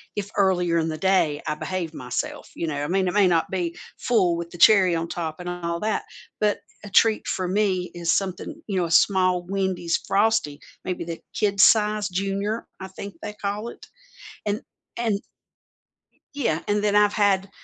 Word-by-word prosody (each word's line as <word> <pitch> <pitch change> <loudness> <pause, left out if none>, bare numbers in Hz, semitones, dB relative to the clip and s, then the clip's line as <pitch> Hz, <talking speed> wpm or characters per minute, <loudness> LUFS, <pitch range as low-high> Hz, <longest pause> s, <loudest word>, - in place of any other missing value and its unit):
if 200 -1 -3
earlier 180 -4 +2
in 165 -1 +1
the 155 - -4
day 155 -4 +2
I 150 - 0
behave 170 0 -4
myself, 125 -1 -4
you 165 - -3
know, 145 -2 -2
I - - -2
mean, 190 +2 +1
it 180 - -1
may 205 -2 +5
not 170 -2 +2
be 175 -3 -2 0.2
full 185 -8 +2
with 170 0 -6
the 175 - -11
cherry 190 -3 +6
on 165 0 -2
top 160 -2 -4
and 180 0 -5
all 170 -1 -3
that, 215 0 0 0.4
but 210 -1 +1 0.3
a - - -8
treat 220 +2 +4
for 185 - -1
me 185 -2 0
is 170 -1 0
something 195 - -3
you 200 -3 -2
know, 180 - +1
a 165 - -5
small 185 0 +4
Wendy's 190 -3 0
Frosty, 200 -8 +2 0.3
maybe 180 -2 -3
the 165 -1 -5
kid 200 -1 0
size, 210 0 +4
junior, 195 +4 -2
I 190 - -6
think 200 +1 -8
they 210 - -5
call 210 +2 -4
it, - - -12 0.6
and 205 +1 0 0.4
and 225 -4 0 1.1
Yeah, 235 - 0
and 205 0 +1
then 205 -1 +2
I've 210 0 +5
had 200 -2 +2
190 Hz, 185 wpm, -24 LUFS, 170-205 Hz, 1.1 s, cherry